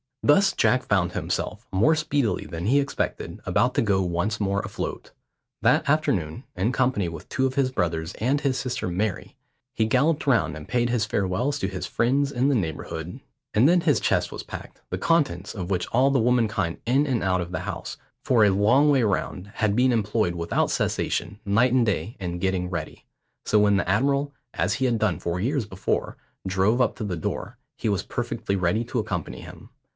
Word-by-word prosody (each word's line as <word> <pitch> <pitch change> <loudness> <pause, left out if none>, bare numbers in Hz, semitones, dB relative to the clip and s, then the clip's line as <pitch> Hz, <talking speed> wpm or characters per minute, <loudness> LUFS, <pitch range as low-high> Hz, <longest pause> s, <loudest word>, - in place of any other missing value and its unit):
Thus 190 +7 +5
Jack 125 0 +2
found 95 -5 +1
himself, - - -3
more 130 +13 +4
speedily 145 -6 0
than 85 +2 -5
he 140 +5 +4
expected, 140 0 -3
about - - +2
to - - +3
go 100 -3 +2
once 90 +4 -1
more 100 -1 0
afloat. - - -5 0.5
That - - +3
afternoon, 125 - 0
in 95 +7 0
company 125 -8 +1
with 85 -2 -8
two 130 - 0
of 130 0 -1
his 135 -2 +2
brothers 80 -7 -1
and 135 +6 0
his 135 -3 0
sister 125 -6 -3
Mary, 95 +3 -2 0.4
he 110 - +1
galloped 145 +7 +1
round 85 - +2
and 75 -1 -9
paid 120 -1 +1
his 120 -3 +1
farewells 110 +8 -1
to 95 - -1
his 95 -1 -4
friends 140 +4 +1
in 130 +1 +1
the 140 - +2
neighbourhood; 85 - -4 0.3
and 115 +6 +5
then 175 +1 +4
his 150 -4 +3
chest - - +1
was - - -6
packed, - - -9
the - - -2
contents 140 - +1
of 95 -4 -5
which 90 -2 -1
all 130 +4 +3
the 135 - +3
womankind 110 -7 +1
in 135 +5 +3
and 130 -5 0
out 95 -1 +1
of 85 0 -6
the 90 - -3
house, - - -5 0.3
for 120 -4 +4
a 105 - +6
long 115 +10 +4
way 140 -3 +4
round, 100 -2 -1
had 105 -2 +1
been 125 +2 +4
employed 105 -4 +1
without 85 -1 0
cessation, 90 +4 -1
night 115 +5 +3
and 125 -2 +4
day, 110 +2 -2
in 90 -2 -4
getting 95 -1 -1
ready. 85 -4 -6 0.4
So 105 - +3
when 105 -1 +4
the 100 - -1
admiral, 140 +7 +1 0.2
as - - 0
he 130 - 0
had 120 -3 +2
done 105 -5 0
four 85 +1 -2
years 125 +4 0
before, 95 -1 -2 0.3
drove 95 +6 +2
up 120 - +2
to 115 - -4
the 95 -4 -3
door, 80 - -4 0.2
he - - -1
was 100 -3 0
perfectly 100 - -3
ready 95 +4 +1
to 120 +1 -2
accompany 90 -7 -4
him. - - -12
110 Hz, 200 wpm, -25 LUFS, 95-130 Hz, 0.5 s, a